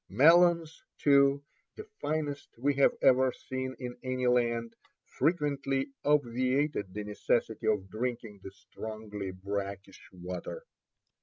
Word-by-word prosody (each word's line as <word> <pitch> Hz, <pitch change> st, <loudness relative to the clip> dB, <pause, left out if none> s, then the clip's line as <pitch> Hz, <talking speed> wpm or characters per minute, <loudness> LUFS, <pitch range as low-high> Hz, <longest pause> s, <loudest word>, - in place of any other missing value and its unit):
Melons, 165 Hz, -, +4 dB
too, 140 Hz, 0 st, +4 dB, 0.3 s
the 430 Hz, -, -7 dB, 0.2 s
finest 150 Hz, -2 st, -3 dB
we 140 Hz, +4 st, +1 dB
have 140 Hz, 0 st, +4 dB
ever 130 Hz, 0 st, +5 dB
seen 130 Hz, +1 st, -5 dB
in 125 Hz, -1 st, -6 dB
any 130 Hz, 0 st, -2 dB
land, 120 Hz, -2 st, +1 dB, 0.3 s
frequently 140 Hz, -3 st, 0 dB
obviated 130 Hz, -4 st, +1 dB
the 105 Hz, +2 st, -5 dB
necessity 105 Hz, +2 st, -1 dB
of 105 Hz, -3 st, +1 dB
drinking 115 Hz, -1 st, -4 dB
the 95 Hz, -, -8 dB
strongly 105 Hz, 0 st, -7 dB
brackish 100 Hz, +1 st, -6 dB
water. 90 Hz, -, -7 dB
125 Hz, 110 wpm, -30 LUFS, 105-140 Hz, 0.3 s, ever